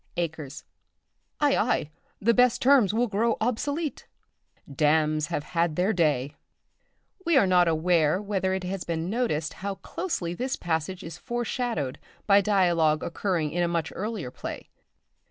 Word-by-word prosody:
"Acres. 155 -5 -4 0.8
Ay, - - +3
ay, 150 - 0 0.3
the 230 +3 +3
best 250 0 +4
terms 255 -7 +5
will 230 +3 +2
grow 225 +1 0
obsolete. 285 +7 -2 0.6
Damns 150 +1 +2
have 145 - -3
had 170 -1 0
their 185 +6 +1
day." 145 -6 +1 0.9
We 340 -4 +3
are 260 - +5
not 180 -2 +4
aware 165 0 +2
whether 195 -2 -1
it 190 - -4
has 185 0 -3
been 165 +2 -3
noticed 185 -11 -1
how 200 0 -3
closely 190 - -4
this 255 +8 -2
passage 175 +2 -3
is 165 -1 -8
foreshadowed 240 - -3 0.3
by 200 -1 +6
dialogue 175 -6 +2
occurring 170 -3 -1
in 175 - -1
a 175 - +2
much 170 -2 -2
earlier 205 - -4
play. - - -7
180 Hz, 145 wpm, -26 LUFS, 160-220 Hz, 0.9 s, by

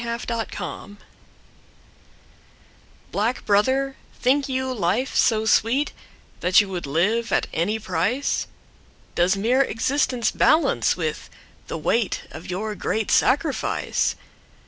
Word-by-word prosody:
Time 235 0 -3
to - - -7
Die 215 -8 -4 2.2
BLACK 225 +6 -1
brother, 260 +7 +2 0.2
think 275 +2 +2
you 260 0 -1
life 220 +5 -1
so 220 -2 +3
sweetThat 220 -5 +1
you 205 -2 +1
would 180 -5 -4
live 205 +11 +1
at - - +2
any 195 +7 0
price? 210 +7 -1 0.7
Does 175 +2 +2
mere 240 +7 +2
existence 255 -1 0
balance 325 - +3
withThe - - -6
weight 230 -4 0
of 160 +3 -9
your 210 +4 -3
great 215 +1 -2
sacrifice? 290 +1 +1
225 Hz, 105 wpm, -23 LUFS, 195-260 Hz, 2.2 s, so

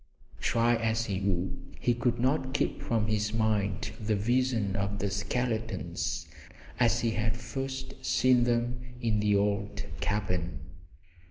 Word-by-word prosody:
Try 115 +1 +3
as 115 0 0
he 100 -3 -1
would 95 -2 -2
he 120 - +2
could 120 0 0
not 130 +1 +1
keep - - 0
from 115 -2 +1
his 105 0 0
mind 105 -1 +1
the 105 -1 0
vision 115 -2 +1
of 100 0 -1
the 100 -1 -1
skeletons 100 -3 -2 0.5
as 120 -1 +4
he 115 - +1
had 110 +1 0
first 130 +3 -5
seen 125 -1 +4
them 120 +1 +1 0.2
in 115 -3 +1
the 105 0 +3
old 100 0 0
cabin. 90 -6 -1
110 Hz, 140 wpm, -30 LUFS, 100-120 Hz, 0.5 s, as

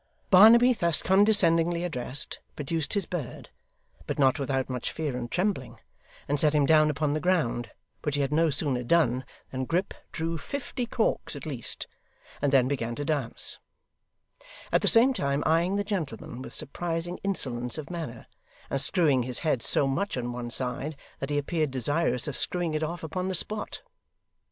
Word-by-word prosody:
Barnaby, 230 +6 +8
thus 170 -7 +3
condescendingly 175 -4 +3
addressed, 140 -4 -3 0.2
produced 155 +2 -2
his 200 -3 +2
bird, 160 -9 -6 0.6
but - - -3
not 135 +2 +3
without 135 -1 -1
much 125 -2 -3
fear 150 -5 -3
and 120 -1 -4
trembling, 180 -7 -2 0.5
and 145 0 0
set 150 +1 +3
him 145 -2 +4
down 155 0 +5
upon 145 0 0
the 155 - 0
ground; 150 - 0 0.3
which 150 -1 -1
he 145 - +1
had 140 +1 -1
no 165 +1 +3
sooner 135 -3 0
done 130 -2 +2 0.3
than 130 0 -3
Grip 175 +7 -1 0.2
drew 165 0 -3
fifty 255 - -4
corks 225 -9 -1
at 140 - -7
least, 135 -7 -2 0.6
and 145 -1 +1
then 130 -3 +4
began 120 -4 -2
to 145 - -4
dance; 145 -6 -1 1.1
at - - +3
the - - +1
same 250 +3 +6
time 140 - -1
eyeing 170 +4 +2
the 205 - 0
gentleman 155 - -4
with - - -8
surprising 170 +3 -3
insolence 125 -11 -2
of 155 +2 -7
manner, 170 -2 -6 0.5
and - - 0
screwing 150 -9 +3
his 125 0 -2
head 135 -6 +1
so 140 - +4
much 135 +6 -1
on 120 0 -3
one 120 -1 -5
side 130 +5 -2 0.2
that 135 - -4
he 145 - 0
appeared 155 +1 0
desirous 135 +1 0
of 150 - -4
screwing 175 -3 0
it 155 - -1
off 165 +2 -4
upon 180 +4 -3
the 190 - -1
spot. 210 +5 -1
155 Hz, 175 wpm, -27 LUFS, 135-175 Hz, 1.1 s, Barnaby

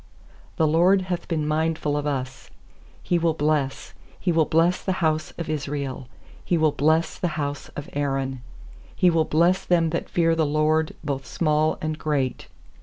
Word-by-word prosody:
"The 160 - +2
LORD 175 +5 +4
hath 180 -2 -4
been 155 -4 -1
mindful 155 -1 0
of 145 0 -1
us, 130 -2 -4 0.5
He 175 - +1
will 165 -1 +1
bless 150 -3 -1
— - - -27
He 180 - 0
will 160 -2 +3
bless 165 +4 +2
the 190 - -1
house 155 -3 0
of 170 - -4
Israel; 140 -4 -4 0.4
He 175 - +1
will 155 -1 +3
bless 155 +3 +1
the 180 - 0
house 145 -1 -3
of 145 - -6
Aaron. 135 -2 -2 0.6
13He 180 -2 +5
will 165 -1 +2
bless 170 +5 +2
them 165 -2 +2
that 170 - -3
fear 165 -1 +2
the 165 -1 +1
LORD, 155 +1 +1
Both 135 -3 -3
small 155 -1 +1
and 155 0 -2
great. 140 -5 -1
155 Hz, 175 wpm, -24 LUFS, 145-165 Hz, 0.6 s, 13He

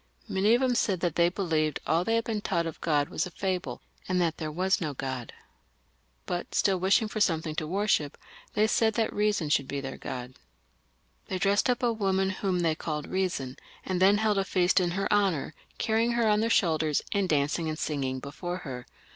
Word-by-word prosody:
Many 205 +4 +3
of 245 - 0
them 255 -1 +2
said 200 -6 +1
that 175 -4 0
they 170 +1 +4
believed 160 -5 0
all 165 +2 +2
they 225 +5 +1
had 230 - +1
been 220 -2 -2
taught 170 -4 0
of 165 - -6
God 145 -3 +1
was - - -1
a - - -8
fable, 185 +1 -3 0.3
and 185 -1 +2
that 170 -2 +1
there 155 -2 -4
was 185 +5 +1
no 150 -4 -3
God; 130 -2 -4 0.9
but 175 -1 -4
still 195 -3 +2
wishing 195 +5 +3
for 215 - -4
something 160 -4 +1
to 155 0 -3
worship, 185 -5 0 0.4
they 210 0 +4
said 220 0 +2
that 225 -2 0
Reason 205 -7 +1
should 140 -2 +2
be 140 - -3
their 135 -1 -6
God, 125 0 -6 0.9
They 190 - -2
dressed 200 +5 +2
up 250 +1 +1
a 235 -1 +3
woman 190 -3 +1
whom 185 -2 -1
they 165 -2 +2
called 155 -1 -4
Reason, 175 -9 -2 0.3
and 185 -1 -1
then 200 +2 +6
held 210 -2 +2
a - - +2
feast 185 0 +2
in 180 -1 +1
her 195 - 0
honour, 190 -8 +1 0.2
carrying 225 +2 +1
her 235 -1 +2
on 210 0 +3
their 225 +1 +1
shoulders, 160 -7 +2
and 200 -3 0
dancing 150 +2 +1
and 155 - -3
singing 135 -4 -2
before 175 +6 -5
her. 125 -3 -6
180 Hz, 205 wpm, -28 LUFS, 155-205 Hz, 0.9 s, then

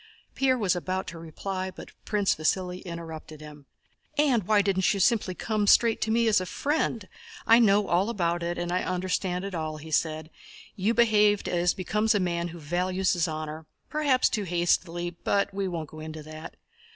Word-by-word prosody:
Pierre 260 -1 +2
was 195 -6 +1
about 185 +2 -2
to 165 - -8
reply, 185 +4 -5
but - - -11
Prince 205 -2 +1
Vasíli 180 +3 -1
interrupted 165 -3 -8
him. 150 -2 -12 0.5
"And 255 -10 +2
why 210 -2 +4
didn't 190 -2 +2
you - - -2
simply 205 -2 +2
come 215 0 -1
straight 230 +2 +5
to 220 - 0
me 230 +1 +2
as 220 - +4
to 185 - +2
a - - -10
friend? 280 - -1 0.4
I 230 +1 +7
know 205 -3 +4
all 185 +5 +2
about 175 -6 -1
it 170 0 -2
and 175 0 -3
understand 185 0 -1
it 200 - -6
all," 155 -2 -3
he 160 +1 -10
said. 155 0 -1 0.4
"You 215 +3 0
behaved 210 -3 +4
as 175 0 +1
becomes 210 +4 +1
a - - +3
man 170 -2 -1
who 170 0 -9
values 180 +4 0
his 175 -1 +1
honor, 155 0 -6 0.2
perhaps 285 -4 +3
too 210 -2 -2
hastily, 175 0 0
but 200 +3 -1
we 195 0 -2
won't 165 -5 -4
go 155 - -10
into 155 0 -7
that. 155 +2 -9
185 Hz, 190 wpm, -27 LUFS, 170-205 Hz, 0.5 s, I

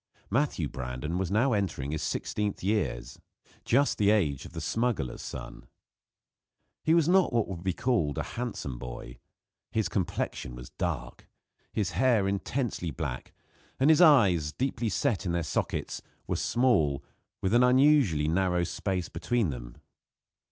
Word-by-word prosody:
Matthew 120 - +1
Brandon 65 +8 -4
was 95 - -1
now 115 +6 +2
entering 80 -9 -1
his 80 - -2
sixteenth 105 -3 -2
years 100 - -1 0.5
just 140 +4 +2
the 100 -1 +4
age 80 -11 +2
of - - -15
the - - -5
smuggler's 115 - -1
son. - - -8 1.2
He 160 - +4
was 165 -3 +4
not 185 +1 +4
what 115 -3 +1
would 90 -4 -6
be 95 - +1
called 95 - 0
a - - 0
handsome 100 - -4
boy. - - -8 0.5
His 110 -2 +1
complexion 85 - -2
was 60 0 -10
dark; - - -4 0.4
his 100 -5 -1
hair 105 +2 +3
intensely 100 -1 -2
black; 75 -6 -5 0.5
and 140 +4 +5
his 160 - +5
eyes, 100 - +5
deeply 120 - -1
set 100 0 0
in 85 - 0
their 85 -1 0
sockets, 75 - -2 0.2
were - - -1
small, 100 - +2 0.4
with 95 +2 0
an 120 - +6
unusually 125 - +4
narrow 90 +1 +1
space 90 0 -2
between 120 -9 -1
them. - - -8
95 Hz, 145 wpm, -29 LUFS, 80-120 Hz, 1.2 s, an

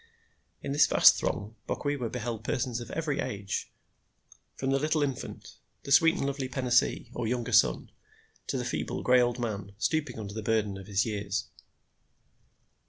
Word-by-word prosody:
In 140 - -3
this 145 +2 +5
vast - - +7
throng 105 +4 -3
Bokwewa 145 -5 -2
beheld 115 -2 -4
persons 125 0 -1
of 120 0 -8
every 150 -3 -2
age, 100 -1 -3 0.8
from 135 0 -2
the 135 - +2
little 155 +1 +1
infant, 135 -3 -5 0.3
the 140 - -7
sweet 165 +5 +6
and - - -1
lovely 140 -1 -2
penaisee, 125 -2 +1
or 120 -2 -2
younger 120 0 -2
son, - - +3 0.6
to - - -1
the - - -3
feeble, - - -3
gray 125 0 +5
old 120 0 +1
man, 105 -5 -4
stooping 145 0 -1
under 100 -2 -6
the 110 - -4
burden 105 -2 0
of 95 - -11
his 100 0 +1
years. 105 -2 -3
120 Hz, 165 wpm, -29 LUFS, 110-140 Hz, 0.8 s, vast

